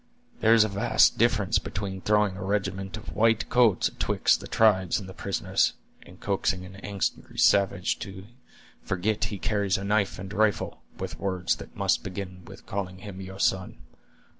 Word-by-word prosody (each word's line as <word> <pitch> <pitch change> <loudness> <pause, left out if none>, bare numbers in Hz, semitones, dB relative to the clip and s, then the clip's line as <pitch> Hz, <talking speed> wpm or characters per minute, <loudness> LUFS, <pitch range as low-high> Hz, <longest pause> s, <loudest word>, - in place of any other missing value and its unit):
There 110 +1 +5
is 115 - +6
a - - +1
vast 100 -1 +3
difference - - +3
between 95 -1 -5
throwing 105 -2 +2
a 95 - -6
regiment 95 -1 -2
of - - -9
white 115 +1 +3
coats 120 -7 +4
atwixt - - +1
the - - -9
tribes 95 -5 +3
and 95 - -9
the 95 - -9
prisoners, 100 0 0 0.3
and 90 +1 -16
coaxing 95 -2 -1
an 95 +1 -12
angry 100 0 -4
savage 100 -2 +3
to 95 -2 -8 0.6
forget 100 +3 -1
he 105 - -4
carries 100 -2 0
a 95 - -5
knife 105 0 +1
and 95 +1 -7
rifle, 105 -3 0 0.2
with - - -6
words 95 -2 -1
that - - -11
must - - +1
begin 90 -1 -7
with - - -13
calling 95 -2 -4
him 95 -1 -9
your 95 0 -9
son. 95 -1 0
100 Hz, 170 wpm, -27 LUFS, 95-105 Hz, 0.6 s, is